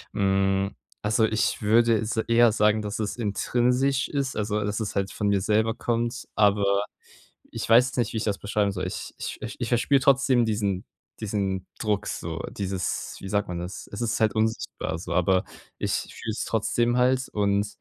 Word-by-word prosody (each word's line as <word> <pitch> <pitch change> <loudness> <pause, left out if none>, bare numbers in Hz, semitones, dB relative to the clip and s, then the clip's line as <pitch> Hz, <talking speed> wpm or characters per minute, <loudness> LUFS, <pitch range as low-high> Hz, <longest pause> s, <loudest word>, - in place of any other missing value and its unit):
Hm, 95 0 +1 0.3
also, 110 +1 +2
ich 110 +1 0
würde 115 +2 +4
s 110 +1 -3
eher 115 +1 +4
sagen, 105 0 +3
dass 105 +1 -4
es 105 -1 -2
intrinsisch 125 +4 +1
ist, 140 -2 -2
also, 105 0 -1
dass 105 +1 -2
es 105 - -4
halt 100 -1 -1
von 105 - -2
mir 100 -1 +3
selber 110 +3 +2
kommt, 120 +1 -2
aber 100 -1 +3 0.7
ich - - -5
weiß 120 +3 +7
jetzt 130 - -8
nicht, 120 - 0
wie 110 - -2
ich - - -2
das 100 -2 -1
beschreiben 100 0 0
soll. 90 -2 -3
Ich - - -6
ich - - -6
ich 120 - -1
verspüre 130 +3 +3
trotzdem 130 -2 +4
diesen 105 -4 -1 0.3
diesen 95 -3 -2
Druck 105 -2 0
so, 85 0 -4
dieses 95 -2 -3
wie 95 - -7
sagt 100 +1 0
man 90 -1 -4
das? 90 +2 -7
Es 100 - -5
ist 115 0 -1
halt 110 -2 +3
unsichtbar 110 -6 -1
so, 85 - -6
aber 90 +1 +2 0.3
ich - - -1 0.2
fühle 110 - -5
es 110 - -3
trotzdem 120 +2 +1
halt 130 +1 +2
und 100 0 +1
105 Hz, 185 wpm, -26 LUFS, 100-115 Hz, 0.7 s, weiß